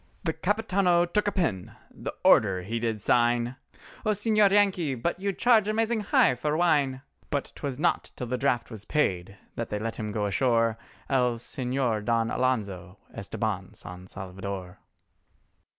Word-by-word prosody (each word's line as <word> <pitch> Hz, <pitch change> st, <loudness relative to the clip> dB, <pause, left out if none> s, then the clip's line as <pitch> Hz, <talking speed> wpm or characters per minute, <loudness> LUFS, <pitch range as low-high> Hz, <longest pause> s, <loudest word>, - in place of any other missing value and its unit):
The 160 Hz, -, 0 dB
Capitano 185 Hz, -1 st, +2 dB
took 210 Hz, +4 st, 0 dB
a -, -, +2 dB
pen—the 135 Hz, -, -4 dB
order 95 Hz, -4 st, +4 dB
he 115 Hz, +5 st, -3 dB
did 110 Hz, -3 st, -2 dB
sign, 120 Hz, +1 st, +2 dB, 0.5 s
"O -, -, 0 dB
Señor 215 Hz, 0 st, +3 dB
Yankee!—but 175 Hz, -, +1 dB
you 200 Hz, +1 st, -1 dB
charge 220 Hz, 0 st, +3 dB
amazing 225 Hz, +1 st, +1 dB
high 205 Hz, -9 st, +3 dB
for 150 Hz, +5 st, -1 dB
wine!" 145 Hz, -6 st, +2 dB, 0.3 s
But 140 Hz, -1 st, -2 dB
'twas 140 Hz, -4 st, -5 dB
not 170 Hz, +4 st, 0 dB
till 125 Hz, -, -4 dB
the 125 Hz, +1 st, -2 dB
draft 125 Hz, -2 st, 0 dB
was 110 Hz, -3 st, -8 dB
paid 100 Hz, -9 st, -1 dB, 0.2 s
they 115 Hz, -3 st, -3 dB
let 115 Hz, +2 st, -4 dB
him 105 Hz, -1 st, -4 dB
go 105 Hz, 0 st, -1 dB
ashore, 115 Hz, +1 st, +1 dB, 0.3 s
El 125 Hz, -3 st, +2 dB
Señor 125 Hz, -2 st, -2 dB
Don 115 Hz, +1 st, +1 dB
Alonzo 100 Hz, -7 st, -1 dB, 0.2 s
Estabán 100 Hz, -1 st, -4 dB
San 90 Hz, 0 st, -10 dB
Salvador. 95 Hz, -1 st, -7 dB
125 Hz, 145 wpm, -27 LUFS, 105-175 Hz, 0.5 s, order